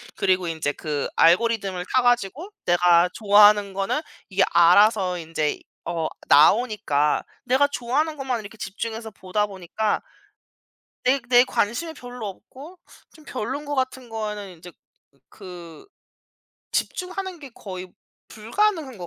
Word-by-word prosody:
그리고 185 -2 +1
이제 160 -3 -2
그 145 -1 -3
알고리즘을 190 0 +2
타가지고 245 - +1 0.2
내가 175 0 +4
좋아하는 205 -2 +5
거는 195 +9 -1 0.3
이게 190 -1 +2
알아서 180 +1 +4
인제 160 -2 -2 0.3
어 165 -2 -2 0.2
나오니까 150 - +3 0.2
내가 265 +3 +3
좋아하는 285 +4 -1
것만 260 -3 -2
이렇게 210 +1 -12
집중해서 220 +2 -5
보다 205 +1 -2
보니까 200 +2 -2 1.0
내 270 +2 +3
내 245 0 +6
관심이 250 +10 -1
별로 245 -5 -8
없고 280 - -12 0.3
좀 310 - -18
별론 265 +5 -4
거 290 - -3
같은 260 -2 -2
거는 210 -4 -5
이제 175 +1 -12 0.6
그 175 - -12 0.9
집중하는 370 0 -3
게 285 -3 -10
거의 185 -2 -8 0.4
불가능한 285 - -1
것 175 - -7
210 Hz, 275 characters per minute, -23 LUFS, 180-255 Hz, 1.0 s, 내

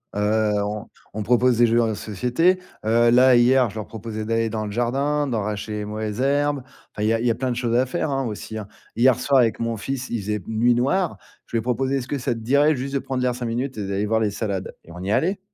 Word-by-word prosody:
Heu, 105 +1 +1
on 105 +1 -5 0.3
on 110 0 -3
propose 125 +1 +3
des 120 - +6
jeux 120 +1 +3
en 110 -1 +1
société. 125 - +1 0.3
Heu, 115 +1 +4
là, 125 +1 +6
hier, 125 0 +4
je - - -13
leur 110 -1 -4
proposais 110 -1 -6
d'aller 115 0 0
dans 110 -1 -3
le 105 - -5
jardin, 140 +6 0
d'arracher 105 -2 -3
les 105 0 -3
mauvaises 105 +1 -4
herbes. 145 0 +1 0.3
Enfin, 105 - -4
il - - +2
y 115 - +3
a 115 - +1
il - - -2
y 120 - +4
a - - -1
plein 130 +1 -2
de - - -2
choses 120 -1 -1
à 130 - +3
faire, 150 +3 -2
hein, 135 -1 -1
aussi, 110 0 -6
hein. 105 -2 -6 0.3
Hier 125 0 +5
soir, 135 0 +3
avec 115 -2 +2
mon 115 -1 -2
fils, 130 +4 -4
il 120 - -2
faisait 105 +1 -2
p 90 - -17
nuit 120 +2 +3
noire. 160 +9 0 0.3
Je - - -25
lui - - +3
ai - - -2
proposé: 130 +3 0
«Est-ce 130 0 -5
que 145 - -2
ça 125 -1 -1
te 115 - -7
dirait 140 +6 +3
juste 135 +2 -5
de - - +2
prendre 130 -1 -3
l'air 125 -1 +1
5 125 -1 -5
minutes 120 +2 -3
et 100 -2 -3
d'aller 100 +1 -1
voir 110 +1 +2
les 105 -2 +1
salades?» 100 -3 -3
Et 85 - -15
on 90 - -9
y 95 - -4
est - - +1
allés. 190 +4 +1
120 Hz, 280 wpm, -23 LUFS, 110-130 Hz, 0.3 s, des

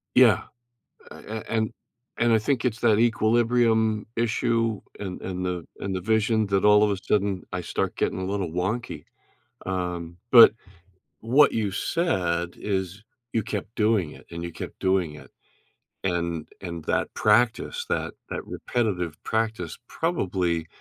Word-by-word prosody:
Yeah. - - +6 0.7
A - - -10
a 110 0 -6
and 110 -1 0 0.5
and 120 0 +3
I 110 - +6
think 125 +3 0
it's 120 -2 0
that 110 -2 +4
equilibrium 115 -1 +2
issue 115 -1 0 0.2
and 95 -3 -5
and 90 0 -4
the 90 -2 -3
and 95 -1 -3
the 90 - -2
vision 110 +1 +2
that 100 -1 +1
all 105 0 +7
of 105 - +3
a 100 - -1
sudden 100 -2 0
I 90 - -2
start - - -2
getting - - -1
a 95 - -3
little 95 -3 -2
wonky, 95 +8 -3 0.6
um 90 -2 -3
but 120 -2 +10 0.7
what 135 +6 +5
you 110 -3 0
said 90 - -1
is 95 0 -3 0.3
you 115 - +1
kept 110 +2 -5
doing 105 -7 +2
it - - -15
and 85 0 -6
you 85 0 -5
kept - - -8
doing 95 -5 +1
it. 75 - -13 0.7
And 85 -3 -1
and 85 -4 -6
that - - 0
practice, 120 - +2
that - - -2 0.2
that - - -5
repetitive 90 -10 -2
practice 110 -7 -2
probably 90 - -1
105 Hz, 150 wpm, -25 LUFS, 90-115 Hz, 0.7 s, but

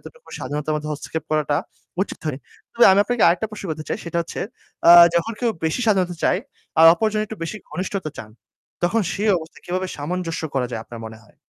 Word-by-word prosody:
এতটুকু 480 +1 -15
স্বাধীনতার 150 +1 -3
মধ্যে 150 0 -3
হস্তক্ষেপ 150 +1 -5
করাটা 150 -2 +1 0.5
উচিত - - -6
হয়নি। 140 -3 -2 0.3
তবে 235 - +5
আমি 195 - +4
আপনাকে 245 -1 0
আরেকটা 180 +6 +1
প্রশ্ন 215 -2 -8
করতে 155 0 -5
চাই, - - -2
সেটা 170 0 -2
হচ্ছে - - -7 0.5
আ - - +11 0.2
যখন 170 +7 +1
কেউ 240 - +2
বেশি 160 +10 0
স্বাধীনতা 185 -4 +2
চায় 180 - +3 0.4
আর 165 - +9
অপরজন 215 +1 0
একটু 220 - -8
বেশি 165 +6 -4
ঘনিষ্ঠতা 185 -3 -3
চান, 110 - -8 0.5
তখন 220 +5 +2
সে 205 - -4 0.2
অবস্থায় 160 0 -12
কীভাবে 185 +1 -2
সামঞ্জস্য 165 +3 -3
করা 125 -2 +1
যায় 110 - -3
আপনার 115 -1 -10
মনে 110 0 -9
হয়? 105 - -24
170 Hz, 200 wpm, -22 LUFS, 150-205 Hz, 0.5 s, আ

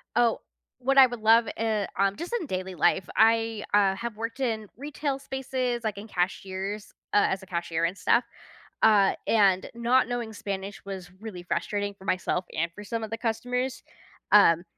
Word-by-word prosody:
Oh, 235 -1 +3 0.4
what 270 +2 +1
I 265 -1 +10
would 245 -2 -7
love 225 +1 +5
in 215 -3 0
um, 195 +1 +2
just 340 - -6
in 340 - -5
daily 185 -3 -4
life, 175 +2 +2
I, 225 -1 +3
uh, 195 -2 +4
have 235 +2 -5
worked 230 +4 -5
in 225 -5 -1
retail 285 0 -3
spaces, 255 -3 -3
like 215 -2 -2
in 205 +2 -8
cashiers 190 +2 -3 0.2
uh, 205 - +5
as 190 - -2
a - - -11
cashier 170 -2 -2
and 180 +4 -2
stuff, 235 +4 +3 0.6
uh, 205 -3 +5
and 195 -4 +3
not 235 +2 +2
knowing 240 -2 -3
Spanish 200 -1 -5
was 190 -2 -7
really 210 -5 -7
frustrating 200 +4 -2
for 190 - -15
myself 185 -1 0
and 170 +1 0
for 210 - -9
some 225 +2 -4
of 220 - -5
the 225 - -4
customers, 250 +3 -2 0.5
um, 170 -5 +6
215 Hz, 180 wpm, -27 LUFS, 195-235 Hz, 0.6 s, I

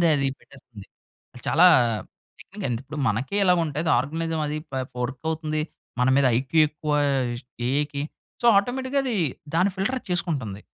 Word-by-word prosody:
అది 140 -1 +1
పెట్టేస్తుంది. 120 -7 -14 0.6
చాలా 170 +3 +5 0.7
టెక్నిక్ 200 -1 -8
అండి. 115 -2 -1
ఇప్పుడు 150 +3 -7
మనకే 125 - -1
ఇలాగుంటే, 170 -5 +2
అది 165 - +2
ఆర్గనైజం 160 +4 -2
అది, 150 +1 -2
ప - - -16 0.3
వర్క్ 130 +2 -4
అవుతుంది 155 -1 -2 0.4
మన 125 - +3
మీద 140 - +4
ఐక్యూ 135 +5 +1
ఎక్కువ 150 0 -5
ఆహ్, 135 -4 +1 0.4
ఏఐకి. 145 +1 -1 0.4
సో - - -1
ఆటోమేటిక్‌గా 260 +6 0
అది 245 -4 -1 0.4
దాన్ని 185 +4 +3
ఫిల్టర్ 200 +7 -1
అది - - -20
చేసుకుంటుంది. 145 - -2
155 Hz, 150 wpm, -25 LUFS, 135-180 Hz, 0.7 s, చాలా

